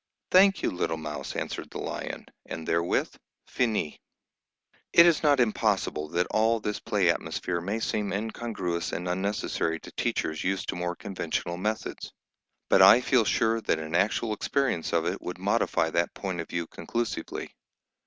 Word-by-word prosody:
"Thank 195 +1 +6
you, - - +1
little 85 -2 -1
Mouse," 75 -3 -5
answered - - -4
the - - -7
lion; - - -5 0.2
and 80 -1 -6
therewith, 85 +1 +1 0.3
finis. 110 -11 -1 0.9
It 170 - +9
is 170 -3 +4
not 145 -3 +4
impossible 105 -9 +1
that 85 +2 +1
all 110 +1 +3
this 105 -1 -3
play 105 -6 +1
atmosphere 85 +2 -3
may 100 +6 -2
seem 105 -2 -1
incongruous 105 -5 -3
and 90 +1 -3
unnecessary 90 -3 -1
to - - -11
teachers 80 0 -2
used 95 +1 -1
to - - -1
more 90 0 -2
conventional 85 -2 -3
methods, 110 +4 -3 0.6
but 95 - +5
I 100 +6 +9
feel 125 -2 +3
sure 115 +1 +2
that 80 - +1
an 80 0 -6
actual 105 +5 +1
experience 125 - -1
of 85 -1 +1
it 90 +3 -2
would 90 - -5
modify 95 -4 +1
that 85 +1 0
point 95 -4 -3
of - - -9
view 85 -1 -2
conclusively. 100 +7 -4
95 Hz, 160 wpm, -27 LUFS, 85-110 Hz, 0.9 s, It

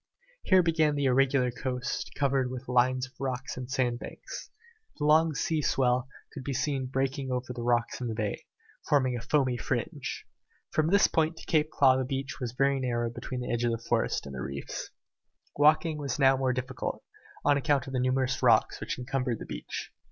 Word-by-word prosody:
Here 185 -1 +5
began 160 -3 +2
the 145 -1 0
irregular 130 -1 +3
coast, 125 0 -3
covered 135 -2 +1
with 130 +1 -7
lines 125 +1 +2
of 130 - -16
rocks 130 -2 -3
and 125 0 -6
sandbanks. 125 -2 -3 0.5
The 150 - -1
long 155 +1 +4
sea 160 +1 0
swell 125 -2 +2 0.3
could 140 - -7
be 140 0 -3
seen 135 -1 -1
breaking 135 +1 -1
over 125 0 -2
the 120 - -6
rocks 120 0 0
in 125 - -2
the 115 - -3
bay, 105 -2 -3 0.4
forming 130 -4 +3
a 120 - -4
foamy 130 0 +1
fringe. 105 - -3 0.5
From 155 0 +2
this 200 +4 +5
point 160 0 +1
to - - -10 0.2
Claw 140 -4 +4
Cape 130 - 0
the 130 - -1
beach 135 +1 -3
was 120 -4 -4
very 135 +1 +2
narrow 120 -2 -1
between 125 +1 -5
the 125 - -3
edge 120 0 0
of 120 - +3
the - - -1
forest - - 0
and 70 - -8
the 65 - -5
reefs. 70 +2 -5 0.7
Walking 155 +1 +4
was 140 -4 -2
now 135 -2 +5
more 130 -1 +1
difficult, 130 +1 -4 0.4
on 145 - +5
account 140 -2 +1
of 135 - -8
the 130 - +1
numerous 130 0 +1
rocks - - +4
which - - -3
encumbered 125 -1 -2
the - - -8
beach. - - -6
130 Hz, 195 wpm, -29 LUFS, 125-140 Hz, 0.7 s, Here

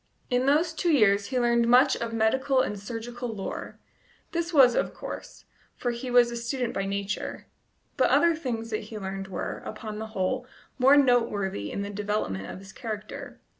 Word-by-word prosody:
In 250 +1 +2
those 315 +4 +3
two 340 +1 +1
years 205 -7 +4
he 255 -1 0
learned 235 -1 +3
much 255 +3 +6
of 230 -1 -4
medical 260 +4 +2
and 205 -5 -3
surgical 240 +3 -5
lore 205 -4 -5 0.5
this 340 0 -2
was 265 -6 +7
of - - -1
course, - - -8 0.3
for 245 - -1
he 240 +2 -5
was 245 -1 +5
a - - -4
student 235 +1 -2
by 195 - -1
nature; 200 +1 -3 0.5
but - - +4
other 340 -1 +4
things 230 -7 -4
that 215 -1 -2
he 215 0 -8
learned 195 -1 -5
were, 190 - -4
upon 215 -1 -6
the 220 - -4
whole, 245 +7 -1 0.3
more 270 +3 +7
noteworthy 210 - +2
in 200 - -3
the 200 - -5
development 205 - -2
of - - -7
his 195 0 -12
character. 215 -2 -7
235 Hz, 180 wpm, -27 LUFS, 205-255 Hz, 0.5 s, was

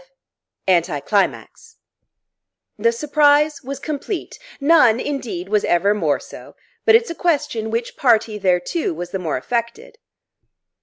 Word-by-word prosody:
V 190 - +5
ANTICLIMAX 190 - -1 1.0
The 230 +2 +3
surprise 295 +3 +2
was 275 +1 -6
complete; 310 +6 -5 0.2
none, 275 -6 +4
indeed, 245 -11 -4
was 210 +1 +1
ever 190 +4 +2
more 165 -8 0
so; - - -13 0.3
but 445 - +6
it's 460 -4 +2
a - - -3
question 285 -10 -1
which 230 +1 -3
party 225 -4 +2
thereto 185 - 0
was 175 +1 -6
the 190 - -3
more 165 -6 -2
affected. 235 - -4
235 Hz, 125 wpm, -20 LUFS, 190-295 Hz, 1.0 s, but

